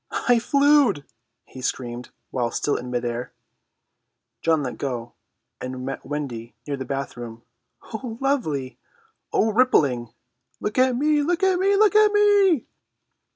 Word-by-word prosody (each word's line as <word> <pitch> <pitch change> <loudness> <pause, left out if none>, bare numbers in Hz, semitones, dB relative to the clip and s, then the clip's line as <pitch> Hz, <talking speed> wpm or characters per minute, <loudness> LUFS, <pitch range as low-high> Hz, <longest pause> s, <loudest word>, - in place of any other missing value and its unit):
"I 245 -1 +5
flewed!" 280 - +3 0.4
he 130 - -11
screamed 125 -1 -4 0.2
while 120 -2 0
still 145 - -1
in 125 - -5
mid 120 0 -2
air. 120 +1 -4 1.1
John 160 -2 +2
let 125 - -5
go 120 -4 -4 0.5
and 130 0 -5
met 135 - -5
Wendy 125 -6 -5
near 145 - -2
the 130 -1 -6
bathroom. 120 -4 -6 0.5
"Oh, 225 0 -5
lovely!" 160 - -1 0.5
"Oh, 220 - +2
ripping!" 145 - +2 0.5
"Look 210 +4 -2
at 255 -1 +4
me!" 300 +3 +2
"Look 340 +5 0
at 380 -2 +3
me!" 395 +1 +3
"Look 425 0 +4
at 425 -1 +6
me!" 405 - +4
150 Hz, 140 wpm, -23 LUFS, -, 1.1 s, at